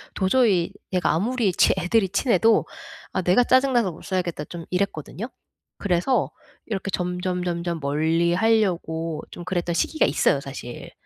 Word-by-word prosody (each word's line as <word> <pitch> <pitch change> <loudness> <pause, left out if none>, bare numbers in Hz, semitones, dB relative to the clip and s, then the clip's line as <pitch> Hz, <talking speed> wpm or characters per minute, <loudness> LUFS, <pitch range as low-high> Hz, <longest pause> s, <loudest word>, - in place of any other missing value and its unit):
도저히 190 -3 +2 0.2
얘가 180 -1 +2
아무리 220 +4 +1
치 - - +4
애들이 190 +2 +1
친해도 225 +2 +3 0.5
'아 - - 0
내가 180 +7 +4
짜증 260 +2 +3
나서 230 -7 +2
못 160 - -13
살겠다.' 175 -5 -2
좀 170 0 -8
이랬거든요. 185 +2 -2 0.5
그래서 200 +7 +1 0.3
이렇게 195 -3 -3
점점점점 180 -1 -2
멀리 160 +4 +1
하려고 175 -6 0
좀 175 - -8
그랬던 175 -2 -1
시기가 315 - +2
있어요 - - +2
사실. - - -8
180 Hz, 320 characters per minute, -24 LUFS, 170-215 Hz, 0.5 s, 치